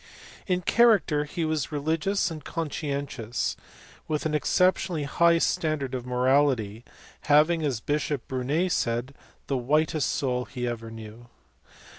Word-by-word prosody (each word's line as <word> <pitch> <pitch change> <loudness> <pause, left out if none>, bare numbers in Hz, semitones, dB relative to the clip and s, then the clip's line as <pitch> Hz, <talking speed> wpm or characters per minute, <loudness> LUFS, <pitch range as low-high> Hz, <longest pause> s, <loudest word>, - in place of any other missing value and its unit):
In 180 -1 0
character 205 -10 +4
he 160 +2 -3
was 155 -1 -1
religious 160 +6 0
and 155 -2 -7
conscientious, 140 -7 -3 0.5
with 155 0 -2
an 155 - 0
exceptionally 180 +1 +1
high 170 +3 +3
standard 155 -5 0
of 125 -1 -4
morality, 125 -4 +1 0.4
having, 155 +3 +4
as 130 -7 -1
Bishop 145 -1 -2
Burnet 140 +8 0
said, 120 -1 -1 0.3
"the 135 - -1
whitest 150 +4 +1
soul" 125 -2 -1
he 125 -3 -4
ever 115 -1 -4
knew. 115 +1 -10
145 Hz, 125 wpm, -26 LUFS, 125-160 Hz, 0.5 s, character